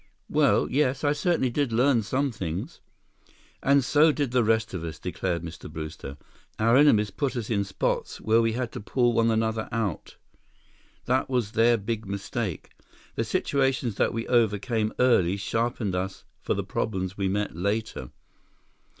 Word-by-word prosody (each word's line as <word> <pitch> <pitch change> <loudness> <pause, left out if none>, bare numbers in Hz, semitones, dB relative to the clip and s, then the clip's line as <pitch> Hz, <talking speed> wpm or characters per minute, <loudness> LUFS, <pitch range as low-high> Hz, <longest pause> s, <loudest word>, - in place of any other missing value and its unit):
"Well, - - +3
yes. 135 -1 0
I 145 0 +3
certainly 155 -5 +1
did 140 -1 0
learn 125 +1 +3
some 135 +6 -1
things." 95 - -5 0.8
"And 140 0 +4
so 150 +4 +5
did 145 -4 -2
the 125 -1 +3
rest 110 0 +1
of 90 -3 -4
us," 80 -2 -5
declared 90 -2 -3
Mr. 80 -1 -8
Brewster. 75 -3 -7 0.4
"Our 115 +2 +3
enemies 110 -8 +5
put 140 -2 -2
us 120 -2 -4
in 100 -3 +1
spots 95 -1 -2
where 110 +1 +3
we 115 -1 +1
had 125 0 -3
to - - -6
pull 120 +3 +1
one 115 0 +3
another 110 0 0
out. 110 -6 -3 0.9
That 130 +2 +1
was 125 -5 0
their 115 +2 +4
big 110 0 -4
mistake. 100 - -4 0.4
The - - -1
situations 135 -4 0
that - - +2
we 115 0 -4
overcame 110 -1 +1
early 100 -7 +3
sharpened 115 0 -1
us 95 +1 -4 0.2
for - - -1
the - - -2
problems 95 -3 -3
we 100 -2 -1
met 105 -2 -2
later. 100 - -2
115 Hz, 160 wpm, -26 LUFS, 100-125 Hz, 0.9 s, so